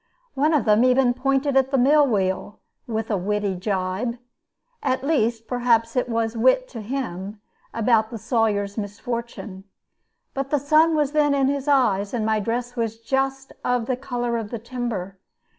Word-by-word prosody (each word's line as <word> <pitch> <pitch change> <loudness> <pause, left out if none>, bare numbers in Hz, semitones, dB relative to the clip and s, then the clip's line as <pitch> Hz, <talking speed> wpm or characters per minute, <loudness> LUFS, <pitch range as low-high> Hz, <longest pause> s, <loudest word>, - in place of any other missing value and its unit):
One 300 +4 +2
of 290 - +1
them 215 +1 +4
even 255 -1 +4
pointed 270 +2 0
at 270 0 +3
my 270 - +2
mill 285 +3 +5
wheel 195 -2 -1 0.3
with 225 -1 -3
a 205 - +2
witty 205 +1 -1
gibe 190 +5 -2 0.6
at 260 -5 -1
least, 235 -6 0
perhaps, 235 -2 +1
it 250 -1 0
was 230 0 -1
wit 260 - +3
to 230 - -7
him 210 -4 -5 0.3
about 225 -1 +2
the 230 - -6
Sawyer's 210 -2 0
misfortune; 210 -1 -6 0.7
but 275 0 -3
the 295 - +2
sun 310 +4 +3
was 295 -2 +1
then 295 -2 +3
in 270 -1 +2
his 280 0 -2
eyes, 230 -7 +2
and 220 -3 -1
my 220 0 +2
dress 240 +3 -3
was 225 -2 -2
just 270 +3 -2
of 245 -2 0
the 255 - 0
color 245 -2 -2
of 220 -2 -5
the 235 - -4
timber. 225 -5 -5
235 Hz, 170 wpm, -23 LUFS, 215-270 Hz, 0.7 s, mill